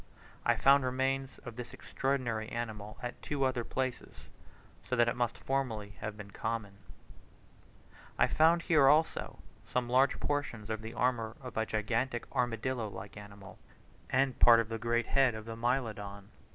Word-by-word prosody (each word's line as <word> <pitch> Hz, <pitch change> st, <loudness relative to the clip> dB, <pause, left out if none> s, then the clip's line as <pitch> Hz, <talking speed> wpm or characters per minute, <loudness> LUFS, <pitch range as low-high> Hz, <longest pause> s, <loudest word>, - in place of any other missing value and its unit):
I -, -, +5 dB
found 140 Hz, 0 st, +5 dB
remains 135 Hz, +1 st, -1 dB
of 120 Hz, -2 st, -7 dB
this 125 Hz, -1 st, -7 dB
extraordinary 125 Hz, -5 st, -2 dB
animal 110 Hz, -3 st, -5 dB
at 125 Hz, -, -5 dB
two 145 Hz, -2 st, -2 dB
other 130 Hz, -2 st, +1 dB
places, 130 Hz, +1 st, -4 dB, 0.6 s
so 125 Hz, -, +1 dB
that 120 Hz, -1 st, +4 dB
it 120 Hz, -, 0 dB
must 120 Hz, -2 st, -1 dB
formerly 125 Hz, -7 st, -2 dB
have 105 Hz, -1 st, -4 dB
been 100 Hz, -2 st, -9 dB
common. 105 Hz, -3 st, -4 dB, 1.4 s
I -, -, +5 dB
found 165 Hz, +2 st, +4 dB
here, 150 Hz, -5 st, +5 dB
also, 155 Hz, +3 st, +2 dB, 0.3 s
some 125 Hz, -1 st, -1 dB
large 130 Hz, +3 st, +3 dB
portions 120 Hz, -7 st, -2 dB
of 110 Hz, 0 st, -3 dB
the 110 Hz, +1 st, -7 dB
armour 115 Hz, -3 st, 0 dB
of 125 Hz, -3 st, -9 dB
a 110 Hz, 0 st, 0 dB
gigantic 115 Hz, +3 st, -1 dB
armadillo 120 Hz, 0 st, 0 dB
like 100 Hz, 0 st, -9 dB
animal, 100 Hz, -2 st, -11 dB, 0.5 s
and 130 Hz, -1 st, +1 dB
part 115 Hz, -1 st, +8 dB
of 115 Hz, -1 st, -1 dB
the 115 Hz, 0 st, -3 dB
great 120 Hz, +1 st, +1 dB
head 135 Hz, -4 st, +3 dB
of 110 Hz, 0 st, -8 dB
a 115 Hz, -, -5 dB
Mylodon. 110 Hz, -5 st, -2 dB
120 Hz, 160 wpm, -32 LUFS, 110-130 Hz, 1.4 s, part